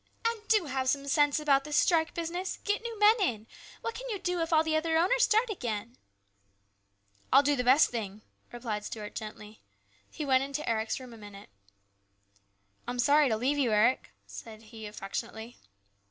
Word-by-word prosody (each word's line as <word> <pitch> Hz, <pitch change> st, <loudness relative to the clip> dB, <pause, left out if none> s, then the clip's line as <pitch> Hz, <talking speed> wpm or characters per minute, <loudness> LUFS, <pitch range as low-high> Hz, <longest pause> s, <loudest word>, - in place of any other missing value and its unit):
" -, -, -35 dB
And 460 Hz, -2 st, -2 dB
do 425 Hz, -6 st, +3 dB
have 265 Hz, -2 st, -1 dB
some 280 Hz, +1 st, -1 dB
sense 290 Hz, 0 st, +3 dB
about 280 Hz, -2 st, +3 dB
this 300 Hz, 0 st, -2 dB
strike 325 Hz, -3 st, +2 dB
business. 345 Hz, +3 st, -3 dB
Get 410 Hz, 0 st, 0 dB
new 460 Hz, -1 st, -6 dB
men 420 Hz, +2 st, +5 dB
in. 225 Hz, -, -1 dB, 0.3 s
What 460 Hz, -, -3 dB
can -, -, -7 dB
you 425 Hz, -, -2 dB
do 360 Hz, -2 st, -2 dB
if 330 Hz, -, -2 dB
all 315 Hz, -1 st, +4 dB
the 320 Hz, -1 st, 0 dB
other 320 Hz, +1 st, +1 dB
owners 415 Hz, +9 st, +3 dB
start 440 Hz, +2 st, +2 dB
again? 235 Hz, -, -4 dB, 0.5 s
" 100 Hz, 0 st, -43 dB
" 100 Hz, 0 st, -39 dB
I'll 275 Hz, +2 st, +7 dB
do 290 Hz, 0 st, +2 dB
the 250 Hz, -, -1 dB
best 260 Hz, +5 st, +5 dB
thing," 215 Hz, -3 st, -5 dB, 0.3 s
replied 230 Hz, -4 st, -4 dB
Stuart 210 Hz, -1 st, -7 dB
gently. 215 Hz, 0 st, -9 dB, 0.5 s
He 305 Hz, -, -6 dB
went 260 Hz, -1 st, +3 dB
into 280 Hz, +2 st, -4 dB
Eric's 220 Hz, +1 st, -1 dB
room 255 Hz, -2 st, -11 dB
a -, -, -12 dB
minute. 205 Hz, -2 st, -12 dB, 0.7 s
" 100 Hz, -, -40 dB
I'm 245 Hz, 0 st, -3 dB
sorry 285 Hz, +3 st, +4 dB
to 220 Hz, -, +1 dB
leave 275 Hz, +6 st, 0 dB
you, 250 Hz, -5 st, +2 dB
Eric," 215 Hz, -, +2 dB
he 100 Hz, -, -44 dB
said 215 Hz, -, -11 dB, 0.2 s
affectionately. 220 Hz, +3 st, -6 dB
260 Hz, 195 wpm, -29 LUFS, 215-320 Hz, 0.7 s, I'll